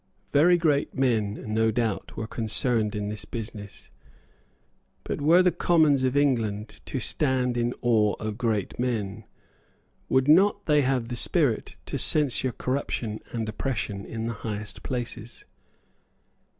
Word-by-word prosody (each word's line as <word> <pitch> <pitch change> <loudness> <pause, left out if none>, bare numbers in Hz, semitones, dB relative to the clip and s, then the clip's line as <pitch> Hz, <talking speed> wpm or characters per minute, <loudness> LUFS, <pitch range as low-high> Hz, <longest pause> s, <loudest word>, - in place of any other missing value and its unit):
Very 170 +5 +5
great 150 -4 +1
men, 110 -6 0
no 110 0 +2
doubt, 110 -2 -2
were 110 - -3
concerned 110 -1 0
in 105 0 -3
this 105 0 -5
business. 105 -3 -8 1.1
But - - -4
were 170 +5 +5
the 180 - +4
Commons 160 -5 +3
of 130 +1 +1
England 115 -7 0
to 135 - -3
stand 130 -1 +1
in 120 0 -1
awe 110 -4 +3
of 110 -1 -4
great 110 -4 -2
men? 110 -4 -2 0.8
Would 130 +1 +2
not 200 +6 +4
they 150 -1 +4
have 130 -3 0
the 125 - -3
spirit 135 -3 +1
to - - -4
censure 130 -4 +3
corruption 120 -4 -3
and 115 -2 -3
oppression 105 -3 -3
in 115 +2 -5
the 115 - -2
highest 105 -2 -6
places? 120 -2 -5
120 Hz, 135 wpm, -26 LUFS, 110-140 Hz, 1.1 s, Very